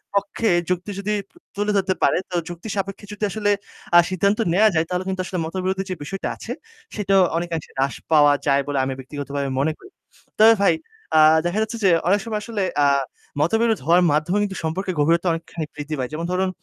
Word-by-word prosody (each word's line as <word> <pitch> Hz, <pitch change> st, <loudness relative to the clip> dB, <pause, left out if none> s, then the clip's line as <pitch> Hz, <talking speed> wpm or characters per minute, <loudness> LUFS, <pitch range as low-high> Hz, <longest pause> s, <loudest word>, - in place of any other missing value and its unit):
পক্ষে 200 Hz, +3 st, 0 dB, 0.2 s
যুক্তি 180 Hz, +3 st, -2 dB
যদি 205 Hz, +2 st, -1 dB, 0.4 s
তুলে 205 Hz, +1 st, 0 dB
ধরতে 190 Hz, -1 st, +1 dB
পারে, -, -, +4 dB
তো -, -, -3 dB
যুক্তিসাপেক্ষে 195 Hz, +3 st, -5 dB
যদি 210 Hz, +1 st, -7 dB
আসলে 205 Hz, -1 st, 0 dB, 0.5 s
আ -, -, +10 dB
সিদ্ধান্ত 200 Hz, +4 st, +1 dB
নেয়া 215 Hz, +3 st, +5 dB
যায় 160 Hz, 0 st, +2 dB
তাহলে 180 Hz, +1 st, -1 dB
কিন্তু 190 Hz, -1 st, -2 dB
আসলে 180 Hz, -1 st, -3 dB
মতবিরোধের 190 Hz, +3 st, -2 dB
যে 185 Hz, -, -2 dB
বিষয়টা 195 Hz, +6 st, -4 dB
আছে, -, -, -8 dB, 0.4 s
সেটাও 195 Hz, -2 st, +3 dB, 0.2 s
অনেকআংশে 170 Hz, -2 st, -4 dB
হ্রাস 135 Hz, +1 st, 0 dB, 0.2 s
পাওয়া 145 Hz, -2 st, +6 dB
যায় 140 Hz, 0 st, +4 dB
বলে 145 Hz, -, -2 dB
আমি 135 Hz, -, -2 dB
ব্যক্তিগতভাবে 140 Hz, +1 st, -4 dB
মনে 155 Hz, +3 st, +2 dB
করি। 385 Hz, -, -15 dB, 0.5 s
তবে 225 Hz, +1 st, +8 dB
ভাই, 200 Hz, -, +5 dB, 0.4 s
আ -, -, +7 dB, 0.3 s
দেখা 180 Hz, +5 st, 0 dB
যাচ্ছে 220 Hz, +2 st, -2 dB
যে 195 Hz, -, +5 dB, 0.2 s
অনেক 200 Hz, +3 st, +4 dB
সময় 220 Hz, -2 st, -2 dB
আসলে 225 Hz, -4 st, -3 dB, 0.2 s
আ -, -, +5 dB, 0.6 s
মতবিরোধ 225 Hz, +7 st, +2 dB
হওয়ার 175 Hz, +3 st, +5 dB
মাধ্যমে 155 Hz, +7 st, +1 dB
কিন্তু 195 Hz, -2 st, -3 dB
সম্পর্কের 180 Hz, +3 st, -2 dB
গভীরতা 165 Hz, +4 st, +2 dB
অনেকখানি 165 Hz, -1 st, -4 dB
বৃদ্ধি 150 Hz, +1 st, -4 dB
পায়। 125 Hz, -1 st, -2 dB
যেমন 165 Hz, +2 st, -3 dB
ধরুন 185 Hz, +1 st, +1 dB
185 Hz, 190 wpm, -22 LUFS, 160-200 Hz, 0.6 s, আ